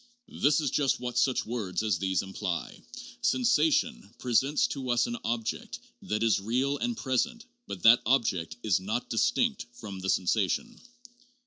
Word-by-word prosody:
This 145 +1 +4
is 145 -4 -1
just 140 -3 +1
what 125 0 -5
such 130 -2 +1
words 110 -4 -3
as 105 -6 0
these 95 0 0
imply: 95 -2 -4 0.4
"Sensation 255 - +2
presents 130 +4 +2
to 135 - -5
tis 120 -1 +3
an 240 0 -4
object 115 -1 -3 0.2
that 105 +1 -2
is 110 -3 +3
real 130 +7 0
and 240 -1 -2
present, 135 - -1 0.2
but 90 - -7
that 115 +2 +7
object 110 -10 +1
is 100 -5 +2
not 110 +6 -3
distinct 215 - +1
from 110 -5 -8
the 95 +1 -3
sensation." 110 - 0
120 Hz, 150 wpm, -28 LUFS, 105-145 Hz, 0.4 s, that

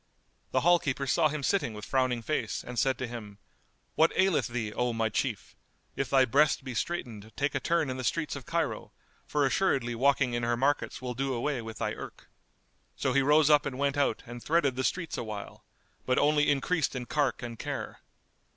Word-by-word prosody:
The - - +1
hall 175 +1 +5
keeper 140 -2 -2
saw 155 +4 +3
him 150 -1 -4
sitting 130 - 0
with 105 - -7
frowning 130 -3 0
face 115 -6 -2
and 125 -1 -4
said 130 -2 +2
to 125 - -3
him, 110 -4 -8 0.6
"What 160 - +4
aileth 190 -2 +3
thee, 115 -3 -3
O 125 0 0
my 115 -1 0
Chief? 110 -2 -3 0.4
If 135 - -2
thy 135 -1 +5
breast 140 +3 +3
be 130 -1 -5
straitened 110 -7 -4
take 140 +1 0
a - - 0
turn 170 -3 +1
in 130 0 -3
the 130 - -4
streets 155 +6 -1
of 135 -3 -9
Cairo, 170 0 -2 0.3
for 145 -1 +1
assuredly 135 -5 +1
walking 135 +1 +2
in 120 - -1
her 120 0 0
markets 135 0 0
will 125 -1 -3
do 135 +1 -2
away 125 +1 -1
with 110 -2 -8
thy - - -2
irk." - - -10 0.6
So 130 - 0
he 140 - +4
rose 150 +2 +5
up 150 0 +6
and 130 -2 -5
went 140 0 0
out 145 -1 0
and 120 0 -8
threaded 150 -5 +2
the 130 - -1
streets 165 +2 -2
awhile, 105 -3 -7 0.4
but 125 - +2
only 150 0 +3
increased 145 +1 +1
in 125 -1 -4
cark 145 -3 0
and 115 -2 -6
care. - - -5
130 Hz, 205 wpm, -29 LUFS, 120-150 Hz, 0.6 s, up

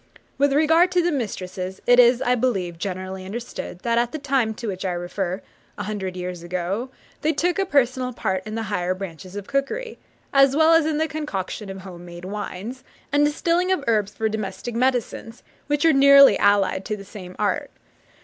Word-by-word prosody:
With 285 0 +4
regard 325 +5 +4
to 355 -1 +3
the 350 - +1
mistresses, 190 - -4
it 245 0 +6
is, 245 0 +6
I 245 - +2
believe, 195 -9 -1
generally 185 0 -4
understood, 195 -3 -7
that 235 0 +1
at 240 0 0
the 310 - -4
time 265 -6 0
to 235 - -7
which 190 -2 -4
I 185 -2 -1
refer, 180 +2 -3 0.3
a 205 - -3
hundred 190 -3 -4
years 180 -1 -5
ago, 180 +7 -3 0.3
they 315 +1 +1
took 355 +4 0
a 390 - +1
personal 255 -4 +1
part 190 -5 -2
in 215 - -5
the 225 - -2
higher 185 -3 -1
branches 185 -1 -8
of 205 -1 -5
cookery, 360 - -2 0.3
as 275 -1 +5
well 320 +2 +5
as 325 -1 +4
in 310 -1 0
the 320 +1 +1
concoction 210 - -4
of 190 0 -7
home 180 -2 -10
made 175 0 -10
wines, 210 +5 -6 0.3
and 290 +1 +3
distilling 335 +5 +1
of 370 -7 +1
herbs 210 -3 +1
for 220 - 0
domestic 215 +2 -4
medicines, 240 -1 -1 0.2
which 290 +2 +1
are 325 - +6
nearly 280 0 +8
allied 200 -2 +3
to 215 - -3
the 200 - -10
same 185 -2 -10
art. 280 +8 -1
225 Hz, 195 wpm, -23 LUFS, 190-280 Hz, 0.3 s, nearly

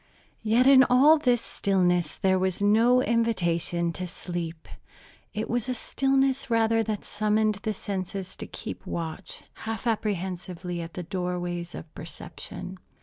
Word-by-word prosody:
Yet 225 +3 +3
in 270 -1 +8
all 285 +5 +6
this 245 -4 +2
stillness 180 -4 +1
there 190 -1 +2
was 185 -1 0
no 230 +5 +4
invitation 175 -8 +1
to 180 +2 -5
sleep. 170 -2 -5 0.6
It 215 +1 -3
was 240 +1 -1
a 255 - 0
stillness 270 +2 +1
rather 225 -1 +3
that 215 -2 -3
summoned 215 0 +1
the 215 0 -2
senses 190 -1 -4
to - - -6
keep - - -8
watch, 165 +2 -5
half 225 0 -5
apprehensively, 185 -5 -2
at 165 0 -8
the 180 - -4
doorways 175 -1 -3
of 155 - -10
perception. 180 +3 -8
195 Hz, 140 wpm, -27 LUFS, 175-230 Hz, 0.6 s, in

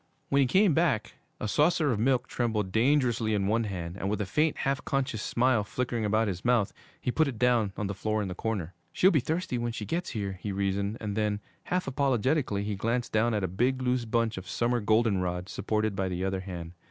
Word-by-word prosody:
When 140 - +3
he 135 - +4
came 185 +5 +4
back, 140 -10 +1 0.3
a - - -2
saucer 150 +4 +3
of 110 - -1
milk 125 +1 +2
trembled 110 -5 -1
dangerously 120 -2 +2
in 100 -1 0
one 110 +3 +1
hand, 90 -3 -5
and 95 - -2
with 105 - -1
a 105 - -1
faint, 150 +10 +1
half 135 -1 -1
conscious 135 -5 -1
smile 120 -1 +2
flickering 120 +1 -2
about 110 +1 +2
his 90 -2 -3
mouth, 120 -5 +2 0.3
he 125 - -1
put 160 +4 +2
it 130 -5 -4
down 120 -4 +3
on 105 - -2
the 100 - -2
floor 110 +2 -1
in - - -3
the 90 - -4
corner. 95 -4 -3 0.2
'She'll 190 - +5
be 155 - +4
thirsty 160 -1 -2
when 120 0 -1
she 105 - -5
gets 175 - -2
here,' 100 -4 -4
he 105 - -3
reasoned; 100 +2 -1
and 105 -2 -4
then, 105 -1 0 0.3
half 180 0 -1
apologetically, 130 -4 +1
he 105 0 -2
glanced 115 +4 -1
down 110 +1 +2
at 105 - -1
a - - +1
big, 125 +8 0
loose 125 -1 +1
bunch 115 -1 0
of 95 +1 -11
summer 120 +2 +1
goldenrod, 100 -5 +1
supported 110 0 -1
by 95 -1 -1
the 90 +1 -2
other 95 0 -1
hand. 90 -3 -6
110 Hz, 225 wpm, -28 LUFS, 100-125 Hz, 0.3 s, She'll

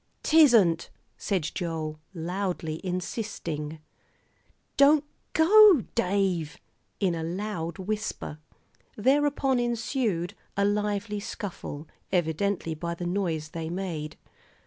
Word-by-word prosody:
"'Tisn't," 235 - +5 0.3
said 180 -6 -1
Joel, 160 -3 -3 0.2
loudly 175 -2 -3
insisting. 175 -5 -4 1.0
"Don't 285 +1 +6 0.3
go, 370 - +7
Dave," 185 -5 0 0.4
in 190 -4 +2
a 165 - -3
loud 170 -1 -3
whisper. 205 -5 -4 0.6
Thereupon 270 +2 +2
ensued 230 -6 -1 0.2
a 200 - +3
lively 205 0 -1
scuffle, 170 -7 -6 0.2
evidently, 175 +1 0
by 170 +2 -4
the 175 - -5
noise 175 -4 -1
they 160 0 -5
made. 170 -4 -4
185 Hz, 95 wpm, -27 LUFS, 165-215 Hz, 1.0 s, go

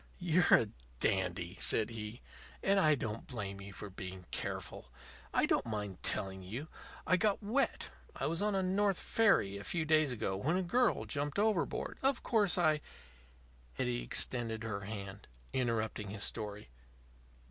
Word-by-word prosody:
"You're 175 -1 +3
a 110 - +6 0.3
dandy," 90 -1 0
said 110 +1 +3
he. 110 +1 -6 0.4
"And 195 0 +4
I 155 -4 +5
don't 115 -4 -4
blame 100 -6 -5
you 100 0 -8
for 100 +1 -8
being 95 -1 -7
careful. - - -5 0.4
I - - +3
don't - - +1
mind 105 -4 -4
telling 95 0 0
you. 120 - -6 0.4
I 185 - +4
got 205 +3 +1
wet. 245 +7 0 0.2
I - - -2
was 165 +3 -1
on 210 -1 +1
a 190 - +1
North 195 +1 +2
River - - -6
ferry 195 - +4
a - - -8
few 165 - -2
days 155 -3 +4
ago 105 -5 -2
when 150 - 0
a 190 - 0
girl 245 +9 +2
jumped 145 +1 -2
overboard. 210 -4 0
Of 270 -1 +1
course, 210 -5 +3
I 155 -3 +3 0.5
" - - -28
Hetty - - -1
extended 110 - +1
her 110 -3 -3
hand, 100 -1 -7 0.3
interrupting 110 -4 -1
his 100 0 -3
story. 105 - -3
115 Hz, 165 wpm, -34 LUFS, -, 0.5 s, a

